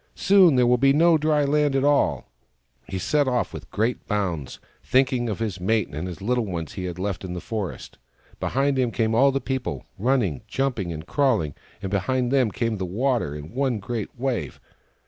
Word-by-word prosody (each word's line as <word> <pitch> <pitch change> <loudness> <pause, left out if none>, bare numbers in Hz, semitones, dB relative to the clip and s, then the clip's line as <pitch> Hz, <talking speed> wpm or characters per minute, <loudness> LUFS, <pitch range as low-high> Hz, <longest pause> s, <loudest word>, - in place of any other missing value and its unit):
" - - -40
Soon 190 -6 +5
there 125 -1 +4
will 125 0 +3
be 135 +1 +5
no 165 +3 +5
dry 150 -1 +2
land 145 0 +2
at 135 - +2
all! 145 0 +2 0.3
" - - -41
He 95 - -3
set 145 +8 +1
off 125 -2 0
with - - -9
great 115 +4 -1
bounds, 90 - -2 0.2
thinking 130 -2 +2
of 105 - -2
his 105 -5 -3
mate 110 +2 +1
and 75 +5 -5
the 95 +2 -7
little 120 -1 +1
ones 85 -4 -4
he 95 - -5
had 90 -1 -5
left 95 0 -3
in 90 -1 -5
the 90 - -4
forest. 105 - -5 0.4
Behind 135 +1 0
him 125 -2 +2
came 110 -1 0
all 135 +5 +5
the 135 - 0
people, 130 -1 -4
running, 110 - +1
jumping 125 -10 -1
and 80 -1 -6
crawling; 110 - +1 0.3
and 95 - -3
behind 125 +6 0
them 130 -4 +3
came 115 +1 -2
the 95 - -3
water, 115 - 0
in 75 +2 -9
one 130 -2 0
great 105 +1 -4
wave. 130 -2 -2
120 Hz, 205 wpm, -24 LUFS, 95-135 Hz, 0.4 s, Soon